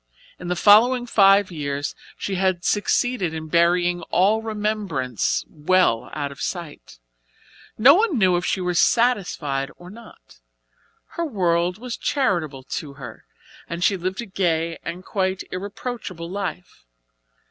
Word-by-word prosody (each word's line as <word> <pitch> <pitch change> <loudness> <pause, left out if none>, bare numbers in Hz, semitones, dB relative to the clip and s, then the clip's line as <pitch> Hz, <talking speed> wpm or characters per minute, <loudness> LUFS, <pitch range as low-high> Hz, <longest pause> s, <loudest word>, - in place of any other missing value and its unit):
In 180 - -7
the 180 - -1
following 240 +6 +5
five 195 -4 +4
years 145 -3 -3 0.2
she 200 - -4
had 185 -2 0
succeeded 205 -4 0
in 160 0 -6
burying 175 +1 +2
all 205 +5 +3
remembrance 210 - -2
well 155 -5 +1
out 145 -2 -3
of 140 - -11
sight. 170 - -6 0.8
No 250 +6 +8
one 395 - +2
knew 185 -4 +4
if 175 - -1
she 190 - -1
were 180 0 -1
satisfied 170 - +1
or 175 +1 -12
not; 215 - -16 0.7
her 340 - -3
world 180 - 0
was 245 +1 -6
charitable 170 - -1
to 140 +2 -6
her 125 -5 -11 0.4
and 170 +1 -4
she 195 - +3
lived 185 +3 -3
a - - -6
gay 170 -4 -1
and 175 +2 -7
quite 190 -1 -1
irreproachable 195 -2 -6
life. 185 - -6
180 Hz, 135 wpm, -22 LUFS, 165-210 Hz, 0.8 s, No